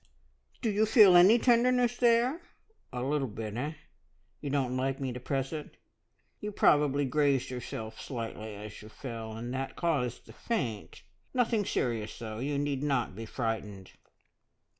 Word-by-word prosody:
Do 225 - +2
you 215 +2 +2
feel 210 -5 +8
any 185 +7 +8
tenderness 245 0 +3
there? 245 +6 +3 0.5
A 125 0 -3
little 140 0 0
bit, 110 -1 -6
eh? 145 +6 -2 0.7
You 145 - -5
don't 135 -3 0
like 135 +2 -1
me 130 -2 -2
to 125 - -6
press 135 +3 -2
it? 150 -2 -7 0.6
You 210 - -4
probably 145 -6 +3
grazed 140 -1 +1
yourself 110 -3 -6
slightly 110 -3 -5
as 105 +1 -9
you 105 - -11
fell, 115 -2 -7
and 120 +3 -5
that 135 +1 -3
caused 140 -9 -1
the - - -13
`faint.' 120 - -3 0.3
Nothing 230 -4 +2
serious, 115 -8 -2
though. 110 -1 -6
You 140 +3 -1
need 140 -1 -1
not 135 -9 0
be 115 +1 -7
frightened." 105 -5 -4
135 Hz, 155 wpm, -30 LUFS, 115-175 Hz, 0.7 s, feel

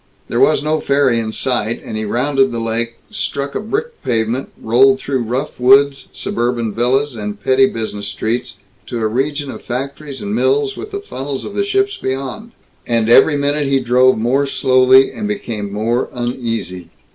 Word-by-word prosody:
There - - -1
was - - +4
no 155 +1 +1
ferry 140 -4 +2
in 110 -1 -3
sight, 120 -2 -1
and - - -6
he 110 0 -2
rounded 135 +4 +1
the 120 - -3
lake, 115 +1 -2 0.2
struck 140 -9 -3
a - - -2
brick 455 - -4
pavement, 115 +2 -1
rolled 130 +4 +4
through 135 -2 -2
rough 125 +6 -3
woods, 135 +2 +4
suburban 120 -2 -2
villas, 130 +4 +1
and 105 -1 -5
petty 130 +5 +4
business 110 -3 -4
streets, 115 +3 -3 0.3
to 120 - -4
a 110 - 0
region 140 +5 -1
of - - -9
factories 140 +3 -5
and 205 0 -3
mills, 415 - +1
with 420 - -7
the 400 -1 -5
funnels 140 - -5
of 400 - -2
ships 395 0 +1
beyond. 135 - -4 0.3
And 115 -2 +1
every 145 +4 +6
minute 145 0 0
he 135 0 +2
drove 125 +1 +3
more 130 +5 +1
slowly 130 0 +4
and 210 - -4
became 115 - -4
more 115 +4 -1
uneasy. 115 -8 -4
130 Hz, 170 wpm, -17 LUFS, 115-140 Hz, 0.3 s, every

